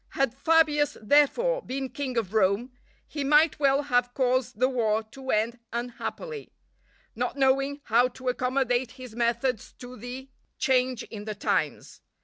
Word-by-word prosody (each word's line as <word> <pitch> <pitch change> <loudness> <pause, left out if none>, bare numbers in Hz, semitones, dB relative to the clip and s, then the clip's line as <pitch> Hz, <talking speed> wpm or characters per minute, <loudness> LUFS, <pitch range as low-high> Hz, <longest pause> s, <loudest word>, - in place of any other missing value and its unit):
Had 270 -3 +1
Fabius, 295 +1 +2
therefore, 295 - +3
been 265 - -4
King 260 -3 -4
of 215 -3 -1
Rome, 215 +4 +2 0.4
he 290 -2 -4
might 300 +3 +4
well 280 0 +3
have 245 -3 +1
caused 250 -3 0
the 255 - +4
war 225 -4 0
to 265 +4 -11
end 230 +2 +1
unhappily, 250 - -5 0.6
not - - -2
knowing 275 +1 +2
how 240 +2 +3
to 255 +1 -10
accommodate 250 -1 0
his 255 -4 -11
methods 235 0 -1
to 250 0 -11
the 250 +3 -8 0.3
change 255 -2 +1
in 210 -2 -9
the 215 -1 -4
times. 205 - -2
255 Hz, 145 wpm, -27 LUFS, 235-275 Hz, 0.6 s, might